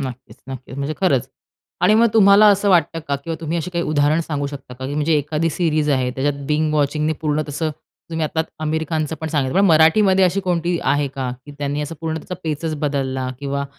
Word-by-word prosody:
नक्कीच, 130 -2 -7
नक्कीच 130 0 -8
म्हणजे 140 +2 -3
खरंच 135 -9 +2 0.5
आणि 185 +4 +5
मग 230 +2 +5
तुम्हाला 205 0 +7
असं 200 0 +3
वाटतं 165 -2 +3
का 140 - +1
किंवा 165 -1 -3
तुम्ही 165 +1 -2
अशी 165 +3 -4
काही 170 -1 -1
उदाहरण 150 +1 +2
सांगू 145 -3 -3
शकता 140 -3 -9
का 130 +1 -6
की 145 - -4
म्हणजे 150 +2 +1
एखादी 155 +3 -1
सीरीज 155 -2 0
आहे 130 -2 +1
त्याच्यात 140 +2 -2
बिंज 155 0 +1
वॉचिंगने 150 +2 +1
पूर्ण 155 0 0
तसं 155 +2 -2 0.4
तुम्ही 160 -1 -1
आता 160 +1 -1 0.2
आमिर 160 +1 -1
खानचं 155 0 -1
पण 160 - -3
सांगितलं. 145 +2 0
पण 200 - +5
मराठीमध्ये 185 +4 +5
अशी 185 +2 +1
कोणती 175 -2 -1
आहे 145 -1 +1
का? 130 -2 -4 0.2
की 145 - -10
त्यांनी 145 +1 -2
असं 150 +2 -5
पूर्ण 160 -1 -2
त्याचा 180 +3 -6
पेचच 155 0 -2
बदलला 135 -3 -1
किंवा 140 0 -2
155 Hz, 210 wpm, -20 LUFS, 140-165 Hz, 0.5 s, तुम्हाला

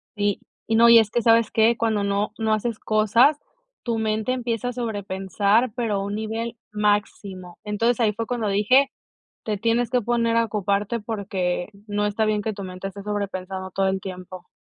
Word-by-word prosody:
Sí, 205 -1 0 0.3
y 225 - +1
no, 235 +1 +7
y 235 - +9
es 220 -2 +2
que, 235 +2 -1
¿sabes 230 -1 +4
qué?, 225 +1 +3
cuando 220 -3 0
no 200 +1 -1
no 220 -1 +1
haces 215 +1 -1
cosas, 220 +8 +3 0.4
tu 235 -2 -2
mente 220 +2 -1
empieza 240 -2 -2
a 250 - -2
sobrepensar, 205 0 0
pero 230 -4 -1
a 195 - -1
un 200 - -4
nivel 225 +2 -4 0.2
máximo. 205 -3 -2
Entonces, 225 +3 0
ahí 220 -3 +2
fue 225 +2 -4
cuando 240 -3 -2
dije: 250 +8 +3 0.5
"Te 210 -2 -2
tienes 230 +2 +1
que 250 0 +2
poner 230 0 +1
a 230 - +2
ocuparte 205 +1 -1
porque 195 -5 -2 0.2
no 205 0 -1
está 210 +1 0
bien 215 -1 +1
que 215 +1 -3
tu 200 - -7
mente 185 +1 -6
esté 200 +1 -9
sobrepensando 190 -2 -4
todo 195 +1 0
el 190 0 -1
tiempo". 185 -1 -9
215 Hz, 190 wpm, -23 LUFS, 200-230 Hz, 0.5 s, y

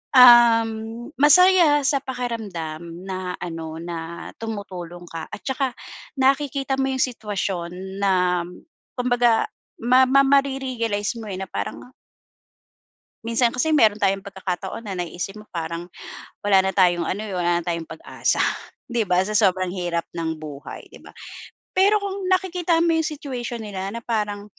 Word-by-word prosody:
um, 240 -2 +8 0.5
masaya 335 -1 +6
sa 285 - +3
pakiramdam 215 - -5 0.2
na 185 -1 -4
ano 165 -2 -5
na 170 0 -6
tumutulong 180 -6 -6
ka 165 -1 -6
at - - -7
tsaka 265 -1 -1 0.4
nakikita 275 0 +1
mo 270 0 +1
yung 260 - -1
sitwasyon 200 -7 -3 0.3
na 180 -3 +2 0.5
kumbaga 245 -2 +2 0.3
ma 255 +2 +5
ma 275 +1 +6
mare-realize 260 -6 0
mo, - - -8
eh, 185 - -4
na 190 - -3
parang 100 0 -4 1.4
Minsan 230 +1 +1
kasi 315 +6 +1
meron 220 -9 +5
tayong 195 -2 +1
pagkakataon 190 +2 -5
na 190 -4 -5
naiisip 175 +4 -5
mo 210 - -14
parang, 170 +1 -5 0.5
wala 195 -2 +4
na 190 - 0
tayong 175 -2 +3
ano, 210 +5 -3
wala 175 -1 +1
na - - -4
tayong 170 -1 -1
pag-asa. - - -2 0.5
'Di 240 -3 0
ba 180 -4 +1
sa 215 - -4
sobrang 185 -3 +2
hirap 175 -2 -2
ng 160 -2 -3
buhay, 150 -2 -9
'di - - -16
ba? - - -13 0.6
Pero 400 +3 +4
kung 395 -2 -4
nakikita 360 -2 +1
mo 335 - +3
'yong 320 -1 +1
situation 245 -4 -5
nila, 195 -2 -4
na 230 +3 -6
parang 210 -3 -2
210 Hz, 145 wpm, -23 LUFS, 180-260 Hz, 1.4 s, um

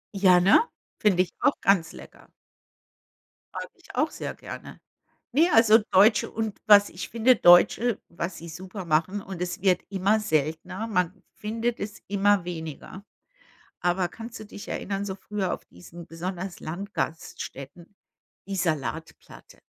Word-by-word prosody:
Ja, 185 -2 +5
ne? 190 +4 +6 0.4
Find 200 -4 +3
ich 185 -2 +2
auch - - +2
ganz 175 -4 +2
lecker. - - -14 1.2
Mag - - -6
ich - - -15
auch - - +2
sehr - - -6
gerne. - - -10 0.5
Ne, 320 +7 +4
also 225 -3 +6
deutsche 210 +4 +5
und 220 -2 -3
was 205 -1 +7
ich 180 - -7
finde 235 +3 +4
Deutsche 205 +6 +5
was 170 +1 -5
sie 170 +1 -9
super 185 +3 -8
machen, 170 +5 +1
und 190 -3 -8
es 180 +1 -4
wird 185 -2 +3
immer 200 +2 +1
seltener- 170 +3 -2
man 180 -3 -1
findet 230 +2 -3
es 210 +1 -6
immer 200 -1 +2
weniger- 170 +3 -7 0.8
aber 180 +1 +1
kannst 230 +5 -9
du 215 - -9
dich 205 - -11
erinnern, 195 0 -3
so 190 -1 -4
früher 200 -1 -3
auf - - -8
diesen 165 - -13
besonders 180 +2 -6
Landgaststätten 165 -3 -6 0.5
die 200 - -3
Salatplatte? 160 -2 -4
190 Hz, 145 wpm, -26 LUFS, 175-210 Hz, 1.2 s, was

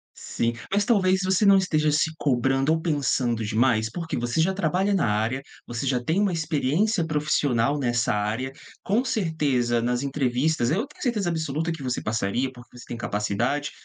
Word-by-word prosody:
Sim, 115 0 -2 0.2
mas 200 +1 +2
talvez 190 -4 +3
você 190 +2 +2
não 200 0 +7
esteja 155 -5 +2
se 155 +2 +2
cobrando 135 +2 +1
ou 160 - 0
pensando 135 -7 0
demais? 110 0 +1
Porque 165 +3 -4
você 120 +6 -1
já 190 +4 +2
trabalha 190 +2 0
na 190 -10 +2
área, 110 +5 0 0.3
você 120 +3 -4
já 125 -2 0
tem 165 +9 0
uma 200 -3 +2
experiência 165 - 0
profissional 145 -3 +1
nessa 120 -3 0
área, 110 +6 -2 0.3
com 215 +6 +1
certeza, 145 - 0
nas 120 +2 -1
entrevistas 135 -1 0
eu 210 - 0
tenho 300 - -16
certeza 215 -9 0
absoluta 160 0 -2
que 160 -4 -7
você 125 -1 -2
passaria, 115 +4 -1
porque 120 0 -15
você 120 - -11
tem 120 - -6
capacidade, 115 +7 -1
140 Hz, 175 wpm, -25 LUFS, 120-170 Hz, 0.3 s, não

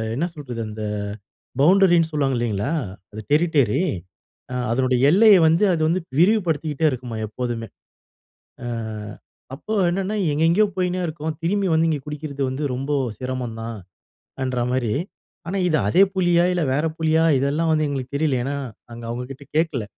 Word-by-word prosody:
என்ன 150 +7 0
சொல்றது, 125 -6 -6
அந்த 110 0 -6 0.8
பவுண்டரினு 175 0 +5
சொல்வாங்க 135 -4 +1
இல்லீங்களா? 115 +4 -1 0.4
அது 110 - -7
டெரிட்டரி, 150 - +3 0.7
ஆங் 125 0 -2
அதனுடைய 130 0 +1
எல்லைய 205 +2 +7
வந்து 165 +6 +4
அது 165 - -1
வந்து 175 +3 +1 0.2
விரிவுபடுத்திக்கிட்டே 165 -6 +2
இருக்குமாம் 120 -4 -5
எப்போதுமே. 115 0 -4 1.0
ஆ - - -4 0.9
அப்போ 215 +10 -5 0.2
என்னன்னா 195 +4 -2 0.2
எங்கெங்கேயோ 165 +8 +3
போயின்னே 180 0 0
இருக்கோம், 155 0 -4
திரும்பி 195 +3 +1
வந்து 160 +1 +3
இங்கே 155 -3 0
குடிக்கிறது 150 -1 -5
வந்து 130 +3 -3
ரொம்ப 135 +3 -4 0.3
சிரமம் 125 -3 -4
தான் 115 -1 -5 0.7
என்ற 130 -1 -1
மாரி, 125 -4 0 0.6
ஆனா 195 +3 -2
இது 155 -3 +2
அதே 185 - +5
புலியா? 175 -2 +3
இல்ல 175 -2 0
வேற 150 +4 +1
புலியா? 160 0 +2 0.2
இதெல்லாம் 150 +4 +1
வந்து 155 -1 +2
எங்களுக்கு 135 -1 -4
தெரியல 140 -3 +1
ஏன்னா, 140 +3 -2 0.4
அங்கே 115 0 -8
அவங்ககிட்ட 125 +3 -6
கேட்கல, 160 -8 0
150 Hz, 145 wpm, -22 LUFS, 125-170 Hz, 1.0 s, எல்லைய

